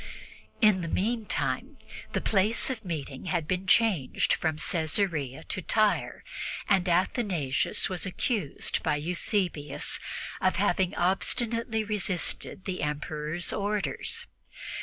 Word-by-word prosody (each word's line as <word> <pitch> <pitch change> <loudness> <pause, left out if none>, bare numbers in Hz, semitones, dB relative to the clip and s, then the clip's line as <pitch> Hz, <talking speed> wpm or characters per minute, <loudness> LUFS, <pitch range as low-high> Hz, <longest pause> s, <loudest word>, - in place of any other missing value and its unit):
In 210 -5 +5
the 165 - -3
meantime 220 +5 -1 0.4
the - - 0
place 215 +5 +2
of 230 -3 -5
meeting 150 -6 -5
had 170 -4 -1
been 185 +1 -1
changed 190 - +3
from 160 -2 0
Caesarea 160 -4 0
to 185 - -3
Tyre, 215 +3 +1 0.4
and 190 -3 +3
Athanasius 175 - +1
was 185 0 -2
accused 185 - -1
by - - +1
Eusebius 170 -1 0 0.4
of 185 - +3
having 185 -1 +1
obstinately 225 +5 +1
resisted 195 -2 -1
the 185 -2 -3
Emperor's 150 +3 -2
orders. 205 0 -1
185 Hz, 110 wpm, -28 LUFS, 160-210 Hz, 0.4 s, In